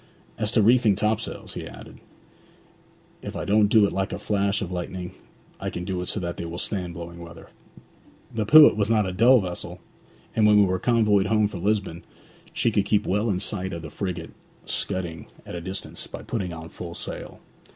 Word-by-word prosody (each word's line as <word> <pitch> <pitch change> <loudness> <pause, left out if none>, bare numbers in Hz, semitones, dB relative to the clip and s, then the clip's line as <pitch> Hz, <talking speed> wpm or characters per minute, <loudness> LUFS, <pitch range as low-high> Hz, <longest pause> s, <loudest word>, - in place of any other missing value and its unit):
'As 105 -1 0
to 110 - +4
reefing 115 -2 +5
topsails,' 110 +3 -2
he - - -6
added, - - -12 1.2
'if - - -7
I - - -3
don't 105 0 +4
do 110 0 +5
it - - -2
like 95 +1 -1
a - - -3
flash 100 -1 0
of 90 - -6
lightning, 90 0 -5 0.5
I - - -3
can 90 - -5
do 90 -1 -2
it 90 - -5
so - - -1
that 85 -1 -4
they 85 - -4
will 85 +1 -6
stand 90 -3 -2
blowing 85 +1 -8
weather. 85 -1 -11 0.8
The 110 -2 -2
Pewit 155 -2 +9
was 105 0 0
not 110 -2 +3
a 95 - -3
dull 120 +5 +6
vessel, 90 -2 -6 0.6
and 110 -1 +4
when 105 0 +6
we 100 - +6
were 95 -1 0
convoyed 105 -4 +3
home 110 -1 +3
from 95 -4 -7
Lisbon, 100 -4 -1 0.5
she 115 - +1
could 100 -2 +1
keep 105 0 +1
well 105 +4 0
in 95 -3 0
sight 95 -1 -3
of 85 -1 -6
the 75 - -8
frigate 90 -4 -4 0.3
scudding 85 -5 -3 0.2
at - - -8
a 85 - -5
distance, 95 +3 -5
by - - -8
putting 95 -7 -3
on 80 0 -8
full 85 0 -8
sail. - - -6
100 Hz, 205 wpm, -25 LUFS, 90-105 Hz, 1.2 s, Pewit